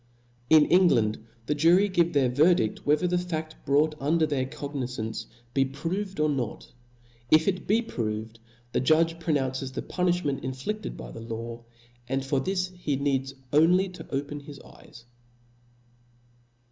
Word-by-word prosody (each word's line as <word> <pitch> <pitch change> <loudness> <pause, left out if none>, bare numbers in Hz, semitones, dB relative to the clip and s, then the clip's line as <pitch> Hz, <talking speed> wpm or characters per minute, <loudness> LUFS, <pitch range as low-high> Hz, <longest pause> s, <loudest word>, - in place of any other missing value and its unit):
In 155 -2 +7
England 115 - +3 0.2
the 150 - 0
jury 170 +7 +4
give 175 -3 +1
their 140 -3 +3
verdidl 140 -2 +3
whe 145 - +3
ther 180 - -2
the 180 0 +1
faft 160 -3 -3
brought 150 +3 +3
under 160 +3 +2
their 140 -4 -1
cognizance 125 -6 -5 0.3
be 135 - +3
proved 165 +8 -4
or 155 - +3
not; 130 -7 -3 0.6
if 155 0 +5
it 185 -2 -1
be 225 +4 +3
proved, 110 - -4 0.3
the - - +1
judge 165 +5 +3
pronounces 135 -5 -1
the - - -4
punilhment 175 -6 0
inflifted 130 +12 -4
by - - -8
the 115 - -9
law, 115 +1 -6 0.5
and 135 0 -1
for 135 0 +1
this 185 +4 -1
he 155 -5 -2
need 135 -1 0 0.2
only 180 +6 +4
to 180 - -11
open 145 +1 -3
his 145 -1 -11
eyes. 120 - -16
145 Hz, 150 wpm, -27 LUFS, 130-170 Hz, 0.6 s, In